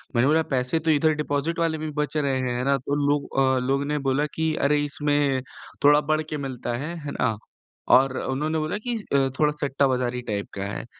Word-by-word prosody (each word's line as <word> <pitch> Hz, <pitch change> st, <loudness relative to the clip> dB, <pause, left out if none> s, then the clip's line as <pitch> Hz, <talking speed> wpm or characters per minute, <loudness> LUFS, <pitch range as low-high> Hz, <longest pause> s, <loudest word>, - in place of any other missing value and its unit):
मैंने 120 Hz, +3 st, +4 dB
बोला 160 Hz, +2 st, +3 dB
पैसे 125 Hz, +5 st, 0 dB
तो 160 Hz, 0 st, +1 dB
इधर 155 Hz, +1 st, +3 dB
डिपोज़िट 150 Hz, +2 st, -2 dB
वाले 165 Hz, -1 st, +1 dB
भी 155 Hz, 0 st, -4 dB
बच 150 Hz, +1 st, -2 dB
रहे 140 Hz, -3 st, +1 dB
हैं। 125 Hz, -1 st, -1 dB
है 125 Hz, -, -1 dB
ना? 140 Hz, 0 st, +3 dB
तो 140 Hz, +2 st, -3 dB
लोग 145 Hz, 0 st, +1 dB
अ, 130 Hz, -1 st, +3 dB
लोग 140 Hz, +1 st, +1 dB
ने 150 Hz, 0 st, 0 dB
बोला 140 Hz, +3 st, +1 dB
कि 160 Hz, 0 st, 0 dB
अरे 145 Hz, 0 st, +2 dB
इसमें 145 Hz, -2 st, 0 dB, 0.4 s
थोड़ा 145 Hz, +1 st, +6 dB
बढ़ 155 Hz, +1 st, 0 dB
के 150 Hz, -, -3 dB
मिलता 125 Hz, -2 st, -4 dB
है। 155 Hz, +7 st, -5 dB
है 145 Hz, -, -3 dB
ना? 115 Hz, -4 st, +1 dB, 0.5 s
और 130 Hz, 0 st, +5 dB
उन्होंने 150 Hz, +4 st, -1 dB
बोला 155 Hz, +5 st, -2 dB
कि 240 Hz, -2 st, 0 dB
स 215 Hz, -, -8 dB
अ, 135 Hz, -1 st, +3 dB
थोड़ा 150 Hz, -1 st, +4 dB
सट्टा 140 Hz, -1 st, +2 dB
बज़ारी 125 Hz, -1 st, -1 dB
टाइप 105 Hz, -3 st, -3 dB
का 95 Hz, -, -3 dB
है। 100 Hz, +3 st, -5 dB
145 Hz, 225 wpm, -24 LUFS, 130-155 Hz, 0.5 s, थोड़ा